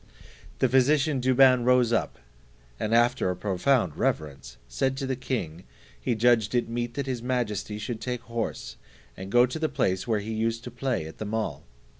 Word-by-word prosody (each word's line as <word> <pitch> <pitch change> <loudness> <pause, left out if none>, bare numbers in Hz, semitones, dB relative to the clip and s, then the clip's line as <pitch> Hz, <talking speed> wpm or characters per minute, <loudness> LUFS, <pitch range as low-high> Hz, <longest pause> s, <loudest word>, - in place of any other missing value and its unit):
The 130 - +3
physician 135 +2 +3
Douban 130 -1 +5
rose 125 -1 +3
up, 115 - -1 0.6
and 110 - -2
after 120 -3 +3
a 90 - -1
profound 95 - +1
reverence, 70 -5 -3
said 130 - -1
to 135 - -3
the 130 0 -1
king, 95 - -4 0.4
he 115 - 0
judged 115 -1 +3
it 120 - +1
meet 120 0 -3
that 140 - -2
his 130 -3 -3
majesty 110 -5 -2
should 110 +2 -5
take 125 0 -3
horse, 115 - -5 0.4
and 95 +1 -8
go 120 +2 +6
to 125 +6 -5
the 155 -1 0
place 95 +2 -1
where 110 -2 +2
he 110 +2 -5
used 115 +1 -1
to 125 - -7
play 125 - -2
at 80 +6 -7
mall. 110 +1 -3
120 Hz, 180 wpm, -26 LUFS, 105-125 Hz, 0.6 s, go